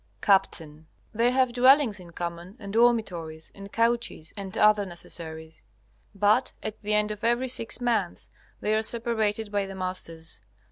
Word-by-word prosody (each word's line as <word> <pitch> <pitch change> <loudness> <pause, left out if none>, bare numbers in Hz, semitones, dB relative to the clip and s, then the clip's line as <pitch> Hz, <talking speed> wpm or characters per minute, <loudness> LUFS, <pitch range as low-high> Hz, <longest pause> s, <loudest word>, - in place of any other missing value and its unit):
Capt. 195 -3 +3 0.5
They 230 +2 +3
have 255 -1 +2
dwellings 255 -3 +5
in 175 -2 -12
common 170 +2 -6
and 200 -3 -8
dormitories, 190 -10 +1
and 200 0 -11
couches 230 -8 0
and 195 0 -6
other 210 -1 +5
necessaries. 160 -3 -7 0.5
But 210 +6 +2
at 215 0 -5
the 210 0 0
end 210 0 +2
of 210 0 -7
every 240 +3 +2
six 230 -1 -1
months 230 -7 -1 0.3
they 210 - +1
are 215 - +2
separated 220 -2 -1
by 200 -1 0
the 195 - -8
masters. 170 - -5
210 Hz, 150 wpm, -27 LUFS, 185-230 Hz, 0.5 s, dwellings